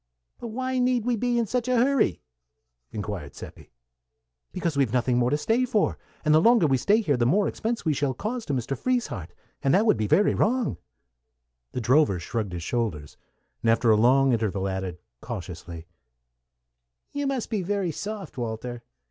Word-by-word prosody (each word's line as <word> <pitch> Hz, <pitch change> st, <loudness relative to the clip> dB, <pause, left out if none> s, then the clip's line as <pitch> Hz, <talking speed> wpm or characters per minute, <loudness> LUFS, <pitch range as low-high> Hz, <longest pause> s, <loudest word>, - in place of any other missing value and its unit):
"But 240 Hz, -, -6 dB
why 255 Hz, +3 st, -2 dB
need 250 Hz, -2 st, +1 dB
we 245 Hz, -1 st, +2 dB
be 240 Hz, +2 st, 0 dB
in 235 Hz, -, +2 dB
such 245 Hz, +3 st, -2 dB
a 255 Hz, -, +2 dB
hurry?" 245 Hz, -, +2 dB, 0.7 s
inquired 100 Hz, -9 st, -5 dB
Seppi. -, -, -11 dB, 0.8 s
"Because 165 Hz, -3 st, -2 dB
we've 135 Hz, -5 st, +2 dB
nothing 125 Hz, 0 st, +2 dB
more 120 Hz, 0 st, +2 dB
to 145 Hz, -, +1 dB
stay 225 Hz, +10 st, +1 dB
for, 230 Hz, -5 st, 0 dB, 0.3 s
and 150 Hz, -, +4 dB
the 155 Hz, -, +6 dB
longer 230 Hz, -2 st, +5 dB
we 135 Hz, -3 st, +3 dB
stay 205 Hz, -, +3 dB
here, 145 Hz, -, +1 dB
the 120 Hz, -1 st, +2 dB
more 200 Hz, +9 st, +3 dB
expense 230 Hz, -1 st, -3 dB
we 155 Hz, -, +2 dB
shall 140 Hz, -2 st, -1 dB
cause 230 Hz, -, -3 dB
to 145 Hz, -, -1 dB
Mr. 130 Hz, +2 st, -2 dB
Frieshardt, 135 Hz, -, -2 dB, 0.3 s
and 135 Hz, +1 st, +3 dB
that 205 Hz, +4 st, +3 dB
would 215 Hz, -, +4 dB
be 105 Hz, -1 st, -1 dB
very 205 Hz, -, +4 dB
wrong." 235 Hz, -, +1 dB, 1.0 s
The 125 Hz, -, -2 dB
drover 125 Hz, -4 st, +3 dB
shrugged 100 Hz, +3 st, -3 dB
his 85 Hz, -1 st, -5 dB
shoulders, 90 Hz, -, -3 dB, 0.5 s
and 115 Hz, -, +1 dB
after 115 Hz, 0 st, +4 dB
a -, -, +6 dB
long 130 Hz, +4 st, +4 dB
interval 105 Hz, -4 st, -1 dB
added, 95 Hz, -2 st, -3 dB, 0.2 s
cautiously, 85 Hz, -7 st, -7 dB, 1.3 s
"You 285 Hz, -1 st, -1 dB
must 265 Hz, -4 st, -2 dB
be 215 Hz, -3 st, 0 dB
very 195 Hz, -1 st, -1 dB
soft, 200 Hz, -4 st, -6 dB
Walter. 120 Hz, +1 st, -4 dB
140 Hz, 180 wpm, -26 LUFS, -, 1.3 s, the